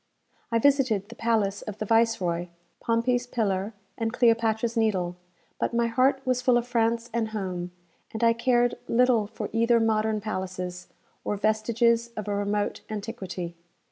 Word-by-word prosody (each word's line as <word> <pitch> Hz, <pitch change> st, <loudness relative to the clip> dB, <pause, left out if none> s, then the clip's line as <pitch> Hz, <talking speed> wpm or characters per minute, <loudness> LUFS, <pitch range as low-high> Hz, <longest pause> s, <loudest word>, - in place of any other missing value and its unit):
I 230 Hz, -, +3 dB
visited 240 Hz, -6 st, +2 dB
the 235 Hz, -, -10 dB
palace 215 Hz, -4 st, 0 dB
of 210 Hz, -2 st, -7 dB
the 215 Hz, -, -3 dB
viceroy, 195 Hz, -6 st, +1 dB, 0.3 s
Pompey's 245 Hz, +2 st, +1 dB
Pillar, 205 Hz, -3 st, -1 dB, 0.2 s
and 225 Hz, -1 st, 0 dB
Cleopatra's 230 Hz, -1 st, +2 dB
Needle; 190 Hz, -6 st, +1 dB, 0.4 s
but -, -, -1 dB
my 235 Hz, 0 st, +3 dB
heart 260 Hz, +4 st, +2 dB
was 255 Hz, -1 st, +1 dB
full 250 Hz, -1 st, +4 dB
of 240 Hz, -, -1 dB
France 235 Hz, 0 st, 0 dB
and 230 Hz, -1 st, 0 dB
home, 185 Hz, -5 st, -4 dB, 0.4 s
and 220 Hz, +1 st, -4 dB
I 230 Hz, 0 st, +5 dB
cared 240 Hz, 0 st, +1 dB
little 240 Hz, -3 st, +3 dB
for -, -, -5 dB
either 230 Hz, +1 st, +3 dB
modern 220 Hz, -1 st, +1 dB
palaces, 185 Hz, -3 st, -5 dB, 0.4 s
or 205 Hz, -, -2 dB
vestiges 230 Hz, +2 st, +2 dB
of 210 Hz, -, -4 dB
a 205 Hz, -, -1 dB
remote 205 Hz, 0 st, -1 dB
antiquity. 195 Hz, -5 st, -5 dB
225 Hz, 150 wpm, -26 LUFS, 205-235 Hz, 0.4 s, I